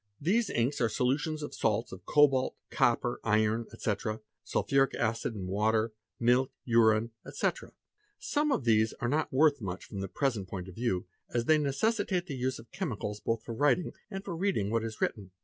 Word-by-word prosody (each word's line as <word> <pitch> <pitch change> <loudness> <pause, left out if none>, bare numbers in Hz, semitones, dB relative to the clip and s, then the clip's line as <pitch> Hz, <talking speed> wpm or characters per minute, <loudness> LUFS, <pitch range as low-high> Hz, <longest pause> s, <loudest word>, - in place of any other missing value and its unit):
These 205 +9 +2
inks 125 +5 0
are 115 - +3
solutions 145 +6 0
of 150 - -6
salts 115 +1 0
of 95 0 -11
cobalt, 140 -3 +4 0.2
copper, 120 0 +2
iron, 110 +1 +2
ete.,— 110 0 -2 0.2
sulphuric 135 -1 +1
acid 115 -1 -1
and 95 -3 -5
water, 110 +3 +1 0.3
milk, 125 +2 +3
urine, 115 -1 +4
ete. - - -1 0.6
Some 295 0 0
of 145 - +1
these 110 -1 +3
are 120 - -3
not 150 +5 0
worth 145 0 +4
much 95 -2 -5
from 100 - -7
the 95 - -3
present 110 -4 -1
point 95 -2 -5
of 95 - -9
view, 95 -4 -1 0.3
as 120 -1 0
they 155 +2 +5
necessitate 185 +5 0
the 150 - -6
use 130 0 -1
of 115 0 -14
chemicals 105 -1 -3
both 115 +1 -1
for 115 - -6
writing 145 +6 +2 0.2
and 195 -1 -6
for 175 - -4
reading 165 - 0
what 115 0 +1
is 110 -1 -6
written. 100 -3 -1
120 Hz, 185 wpm, -30 LUFS, 110-145 Hz, 0.6 s, they